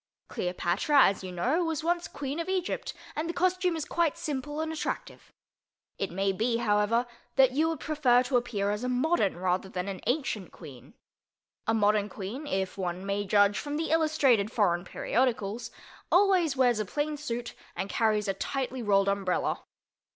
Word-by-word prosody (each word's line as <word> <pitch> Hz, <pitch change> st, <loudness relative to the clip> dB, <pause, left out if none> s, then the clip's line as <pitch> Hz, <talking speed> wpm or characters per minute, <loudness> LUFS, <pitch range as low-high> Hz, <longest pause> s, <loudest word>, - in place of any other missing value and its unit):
Cleopatra, 185 Hz, -, +2 dB
as 195 Hz, -1 st, +2 dB
you 185 Hz, -, -5 dB
know, 255 Hz, -, +1 dB
was 320 Hz, -2 st, -2 dB
once 345 Hz, +1 st, 0 dB
Queen 285 Hz, +2 st, -5 dB
of 335 Hz, -, -3 dB
Egypt 370 Hz, -2 st, -2 dB, 0.2 s
and 320 Hz, +2 st, -2 dB
the 340 Hz, -, -3 dB
costume 365 Hz, -1 st, +1 dB
is 315 Hz, -2 st, -3 dB
quite 335 Hz, -3 st, 0 dB
simple 295 Hz, -1 st, -4 dB
and 320 Hz, 0 st, -2 dB
attractive. 315 Hz, -, -5 dB, 0.7 s
It 195 Hz, -, -1 dB
may 195 Hz, +3 st, 0 dB
be, 230 Hz, +4 st, 0 dB
however, 225 Hz, +1 st, +2 dB, 0.3 s
that 265 Hz, -2 st, +6 dB
you 310 Hz, +5 st, +2 dB
would 325 Hz, -, -3 dB
prefer 260 Hz, -5 st, +3 dB
to 255 Hz, +1 st, -2 dB
appear 220 Hz, -5 st, 0 dB
as 210 Hz, +3 st, -3 dB
a 250 Hz, -, -1 dB
modern 250 Hz, -, +1 dB
rather 185 Hz, +1 st, -1 dB
than 180 Hz, 0 st, -4 dB
an 195 Hz, -2 st, -5 dB
ancient 245 Hz, -, -1 dB
queen. 130 Hz, -4 st, -13 dB, 0.7 s
A 225 Hz, -, +3 dB
modern 210 Hz, -1 st, +2 dB
Queen 215 Hz, +10 st, -6 dB
(if 190 Hz, -4 st, -2 dB
one 180 Hz, 0 st, -3 dB
may 200 Hz, +1 st, -1 dB
judge 205 Hz, 0 st, +4 dB
from 290 Hz, 0 st, -3 dB
the 320 Hz, 0 st, -2 dB
illustrated 290 Hz, -10 st, +3 dB
foreign 180 Hz, -6 st, +1 dB
periodicals) 235 Hz, 0 st, -1 dB, 0.4 s
always 360 Hz, -6 st, +4 dB
wears 245 Hz, -4 st, +3 dB
a 215 Hz, -, -1 dB
plain 295 Hz, +8 st, -2 dB
suit 240 Hz, -5 st, -4 dB, 0.2 s
and 195 Hz, -, -3 dB
carries 215 Hz, -1 st, +1 dB
a 195 Hz, -, +1 dB
tightly 260 Hz, +5 st, -3 dB
rolled 200 Hz, -3 st, +3 dB
umbrella. 195 Hz, -2 st, 0 dB
240 Hz, 175 wpm, -29 LUFS, 200-300 Hz, 0.7 s, that